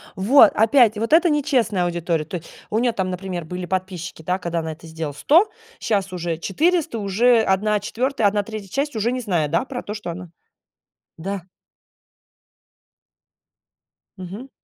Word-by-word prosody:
Вот 215 +5 +6
опять, 225 0 +4
вот 230 +7 -1
это 340 +2 +6
нечестная 255 - +1
аудитория. 170 -2 -1
То 175 +4 -5
есть 165 - -12 0.2
у 215 - +1
нее 240 0 +2
там, 190 -4 -2
например, 180 -2 -4
были 180 +2 -5
подписчики, 185 -3 -4
да, 180 +4 -1
когда 170 -1 -2
она 160 0 -4
это 160 +1 -14
сделала, 160 -2 -5
100, 335 - +4 0.3
щас 200 -4 -1
уже 170 -2 -3
400, 315 - 0
уже 225 +4 +3
1/4, 210 +4 +1
1/3 205 0 -2
часть 280 +5 -2
уже 225 +3 0
не 255 - -2
знает, 170 -9 0
да, 170 +10 +1
про 250 -2 -5
то, 210 - -5
что 205 -5 -5
она 180 0 -8 0.9
Да. 195 +3 -4 2.8
Мгм. 195 +9 -8
200 Hz, 150 wpm, -22 LUFS, 175-235 Hz, 2.8 s, Вот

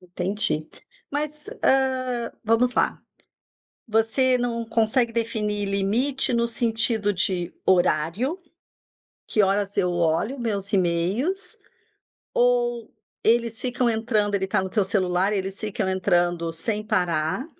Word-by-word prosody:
Entendi. 180 -2 -2 0.4
Mas, 300 +1 -4
hã 255 -3 +1
vamos 230 +3 +2
lá. - - +1 0.9
Você 225 +4 +3
não 235 -1 -2
consegue 230 +2 +1
definir 210 -3 -1
limite 220 +8 +1
no 235 0 +2
sentido 225 -2 +1
de 180 -1 +2
horário? 180 - +1 0.9
"Que 215 - +2
horas 200 +1 0
eu 180 -3 +2
olho 175 - 0
meus 200 -4 -3
e-mails?" 195 - 0 0.8
Ou 240 -1 +1 0.3
eles 230 0 +2
ficam 245 -1 0
entrando? 220 -2 0
Ele 190 -1 -1
tá 190 - +1
no 190 - -4
teu 200 +1 +1
celular, 190 0 +1
eles 195 -1 -3
ficam 210 -3 -2
entrando 175 -3 +1
sem 210 +6 -3
parar? 180 - 0
215 Hz, 115 wpm, -24 LUFS, 190-240 Hz, 0.9 s, Você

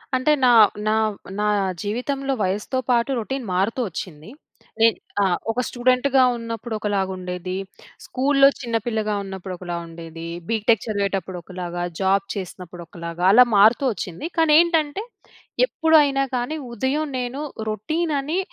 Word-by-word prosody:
అంటే 255 +4 +2
నా, 250 - +6 0.4
నా, - - +3 0.5
నా 210 - +1 0.4
జీవితంలో 270 +6 -2
వయసుతో 210 +7 -1
పాటు, 240 +2 +2
రొటీన్ 265 +2 -4
మారుతూ 205 +7 0
వచ్చింది. 165 -1 -8 0.5
నేను, 225 0 +5 0.3
ఆ! - - +4 0.3
ఒక 245 - -3
స్టూడెంట్‌గా 255 +2 +2
ఉన్నప్పుడు 230 0 -6
ఒకలాగుండేది. 185 -3 -3 0.5
స్కూల్‌లో 275 +1 +4
చిన్నపిల్లగా 225 -3 -1
ఉన్నప్పుడు 190 -1 -7
ఒకలా 175 -1 -5
ఉండేది. 165 0 -9 0.2
బీటేక్ 225 -1 +2
చదివేటప్పుడు 195 -4 -2
ఒకలాగా, 175 -1 -5 0.2
జాబ్ 195 +1 +2
చేసినప్పుడు 180 -2 -7
ఒకలాగా, 170 +1 -7
అలా 250 +4 +8
మారుతూ 220 +6 +5
వచ్చింది. 190 - -5
కానేంటంటే, 320 +2 +3 0.6
ఎప్పుడైనా 300 - +3
కాని, 250 +6 -2 0.2
ఉదయం 270 +7 -1
నేను 250 +4 -4 0.3
రొటీన్ 310 - -2
అని, 315 +7 -2
225 Hz, 120 wpm, -22 LUFS, 190-270 Hz, 0.6 s, అలా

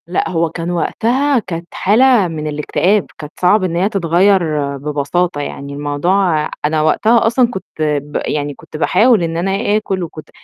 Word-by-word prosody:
لأ 175 - -1
هو 170 -2 0
كان 165 +2 -4
وقتها 250 +10 +1
كانت 170 -5 -6
حالة 230 0 +3
من 155 -2 -5
الاكتئاب، 170 +7 0
كانت 150 0 -9
صعب 185 +3 +4
إن 175 -2 -1
هي 185 +4 +1
تتغيّر 170 -6 +1
ببساطة 150 +3 -1
يعني، 140 0 -6
الموضوع 155 +3 0 0.2
أنا 155 +1 +1
وقتها 220 +10 +3
أصلًا 240 +2 +3
كنت 190 - -5 0.2
ب 150 -1 -1
يعني 145 -1 -2
كنت 155 - -11
باحاول 215 +5 +3
إن 165 0 -2
أنا 195 +3 0
آكُل 195 -4 -3
وكنت 155 -2 -9
170 Hz, 160 wpm, -16 LUFS, 150-200 Hz, 0.2 s, صعب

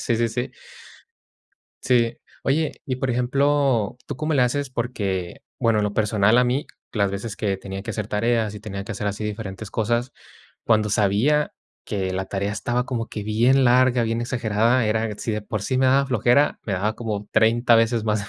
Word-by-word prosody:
Sí, 115 - 0
sí, 115 0 +1
sí. 120 +3 -3 1.3
Sí. 120 -2 +2 0.3
Oye, 150 +3 0
y, 130 -3 -2
por 130 0 -1
ejemplo, 130 -2 +1
¿tú 145 - -4
cómo 155 +2 -1
le 130 - +4
haces?, 140 +3 0
porque, 100 -8 -3 0.2
bueno, 115 -2 +2
en 105 - +1
lo 105 - -2
personal 105 +1 +3
a 125 - +5
mí, 125 +4 0 0.3
las 100 -3 +1
veces 100 +1 -5
que 100 -2 -1
tenía 95 0 -7
que - - -5
hacer 105 -2 -3
tareas 110 0 0
y 105 - -8
tenía 100 -2 -6
que 115 - -5
hacer 105 0 -4
así 100 +1 -3
diferentes 105 -1 -5
cosas, 120 +3 -1 0.5
cuando 110 -2 +2
sabía 110 +9 +2 0.3
que 95 -2 -2
la 95 +1 -2
tarea 100 +1 -2
estaba 120 +4 -1
como 120 -3 -3
que 105 - -5
bien 120 +6 +3
larga, 125 0 +4
bien 115 0 -1
exagerada 120 0 +1
era, 110 +1 0
si 115 - -3
de 105 0 -3
por 105 -1 -4
sí 130 +4 -1
me 130 - +3
daba 135 +2 +4
flojera, 125 +3 +2
me 100 - -1
daba 105 +4 -1
como 105 -3 -4
30 115 +2 +4
veces 115 0 +2
más 105 -2 -1
115 Hz, 195 wpm, -23 LUFS, 105-125 Hz, 1.3 s, a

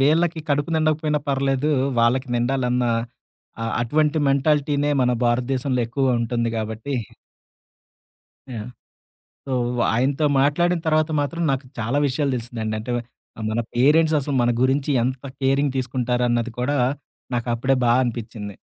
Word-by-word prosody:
వీళ్ళకి 160 +4 +2
కడుపు 145 +2 0
నిండకపోయినా 155 -1 +1
పర్లేదు 135 +1 +1 0.3
వాళ్ళకి 125 +3 +2
నిండాలన్నా 125 0 +1 0.7
ఆహ్, 115 - -2
అటువంటి 150 +5 +1
మెంటాలిటీనే 145 +1 +2
మన 125 -1 +3
భారతదేశంలో 125 +2 0
ఎక్కువ 125 0 +1
ఉంటుంది 115 0 -1
గాబట్టి. 110 +5 -4 1.6
యాహ్! 110 0 -6 0.8
సో 135 - -5 0.4
ఆయనతో 135 +6 +1 0.2
మాట్లాడిన 175 +5 +2
తర్వాత 155 0 +2
మాత్రం 165 +4 -3
నాకు 135 0 -2
చాలా 120 +5 0
విషయాలు 140 +1 0
తెలిసిందండి. 115 -2 -4
అంటే 115 +3 -5
వ - - -1 0.5
మన 110 - 0 0.2
పేరెంట్స్ 155 +5 +4
అసలు 140 0 -3
మన 120 0 +3
గురించి 135 +3 +2
ఎంత 130 +2 -3 0.2
కేరింగ్ 135 +1 +2
తీసుకుంటారన్నది 125 -1 0
కూడా 140 +4 0 0.6
నాకు 120 0 -2
అప్పుడే 130 +3 +1
బా 120 - +4
అనిపించింది. 110 -4 -5
130 Hz, 125 wpm, -22 LUFS, 120-145 Hz, 1.6 s, పేరెంట్స్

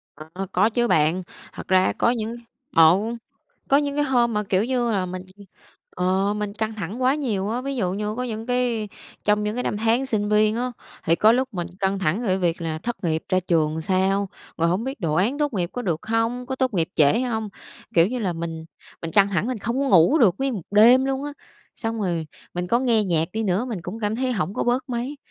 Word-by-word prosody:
Ờ, 155 +1 -12
ơ, 195 +1 -4
có 210 +5 +3
chứ 240 +1 +1
bạn. 160 +2 +2 0.3
Thật - - -9
ra 185 0 +3
có - - +3
những 230 -1 -2 0.4
ờ, 165 +1 +7 0.7
có 275 - +5
những 285 0 0
cái 295 - +2
hôm 240 -4 +2
mà, 210 - +1
kiểu 195 +1 +1
như 245 -2 0
là, 190 -3 0
mình 185 0 -6 0.7
ờ, 190 +3 +1
mình 210 -1 -3
căng 220 0 -3
thẳng 210 +5 -5
quá 260 +2 +4
nhiều 215 -9 -2
á, 240 +3 -1
ví 275 0 -4
dụ 185 -5 0
như 210 +2 -3
có 250 - -2
những 225 -2 -5
cái 245 -4 0 0.4
trong 210 0 +2
những 210 +1 -2
cái 250 - -2
năm - - -2
tháng 230 +5 +1
sinh 210 -4 -1
viên 215 +1 +3
á, 250 +1 -2 0.3
thì 165 - +3
có 215 +6 +5
lúc 260 +2 +1
mình 175 -2 -3
căng 195 0 +1
thẳng 190 +4 0
về - - -3
cái 190 0 +1
việc 175 -2 0
là 160 -1 -3
thất 215 +1 -5
nghiệp 160 -1 0
ra 185 0 +2
trường 160 -4 +1
làm 160 - -3
sao, 190 +3 +1 0.3
rồi 165 +1 +2
hổng 190 +7 0
biết 265 -2 -5
đồ 160 -5 0
án 220 - +1
tốt 295 -3 0
nghiệp 180 -3 -1
có 245 - -4
được 170 -4 -2
hông? 225 +2 0
Có 265 -1 -3
tốt 255 -5 0
nghiệp 165 -3 +1
trễ 150 - +4
hông? 220 -4 -2 0.5
Kiểu 165 0 +6
như 250 +3 -3
là, 190 -6 -1
mình 165 -1 -5 0.4
mình 165 - -4
căng 200 -1 +5
thẳng 190 +3 0
mình 250 -3 -2
không 235 +6 -2
có 280 - 0
ngủ 185 - +5
được 200 -9 +5
nguyên 270 -2 -1
một 190 - -5
đêm 240 +6 +6
luôn 270 +1 -2
á, 290 - -5 0.4
xong 225 -1 -4
rồi 170 -5 -1 0.3
mình 180 0 -2
có 235 +6 +2
nghe 230 -5 +2
nhạc 165 -3 0
đi 220 - -2
nữa 200 +2 0
mình 220 -6 -3
cũng 210 +6 -6
cảm 210 +1 -1
thấy 255 0 0
hổng 195 -2 -2
có - - -1
bớt 250 +3 0
mấy, 250 +4 -3
210 Hz, 245 wpm, -23 LUFS, 185-245 Hz, 0.7 s, ờ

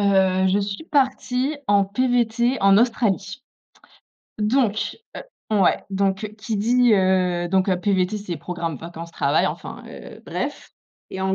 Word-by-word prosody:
heu, 190 -2 +3
je 195 +2 +2
suis 200 +7 -4
partie 265 -1 0
en 200 -1 +4
PVT 240 +3 +1
en 195 0 +6
Australie. 225 -2 0 1.0
Donc, 215 -1 0 0.2
heu - - -5 0.4
ouais. 195 -3 +2
Donc 195 +2 -1
qui 215 0 -4
dit 240 +2 +3
heu, 185 -2 +2
donc, 190 +1 +1
heu, 185 -2 +2
PVT 190 0 0
c'est 185 -4 -5
Programme 165 -1 -4
Vacances-Travail, 170 +2 -1
enfin, - - -6
heu, - - -11
bref. - - -5 0.4
Et 190 - -6
en 190 0 0
200 Hz, 140 wpm, -22 LUFS, 190-230 Hz, 1.0 s, en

